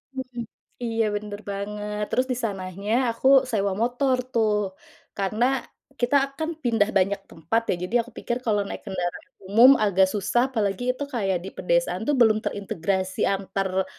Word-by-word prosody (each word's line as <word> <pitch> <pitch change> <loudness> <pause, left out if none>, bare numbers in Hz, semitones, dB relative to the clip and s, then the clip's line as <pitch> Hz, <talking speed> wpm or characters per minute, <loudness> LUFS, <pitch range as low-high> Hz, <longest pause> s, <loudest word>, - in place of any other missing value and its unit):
Hmm, 255 -2 -5 0.4
iya, 230 -1 0
bener 205 0 -5
banget. 210 +1 -4
Terus 255 - +1
di - - +1
sananya 195 0 -3 0.2
aku 245 - 0 0.2
sewa 200 -3 +1
motor 250 +3 +2 0.2
tuh, 210 -4 +1 0.4
karena 210 +5 +1 0.5
kita 245 +3 +2 0.2
akan 315 +2 -3
pindah 225 -4 +2
banyak 195 +1 +1
tempat, 170 +9 -1
ya. - - +3
Jadi 215 +7 -3
aku 240 +2 -13
pikir 235 - -2
kalau 210 -2 +2
naik - - -6
kendaraan 175 -2 -4 0.2
umum 230 +7 +7
agak 190 -2 +4
susah, 220 +6 +1
apalagi 215 -2 -1
itu 285 - -4
kayak 195 -6 +1
di 190 - -6
pedesaan 175 +1 0
tuh 295 - +3
belum 220 -4 +5
terintegrasi 190 -2 -2
antar 195 -1 -1
210 Hz, 155 wpm, -25 LUFS, 195-235 Hz, 0.5 s, umum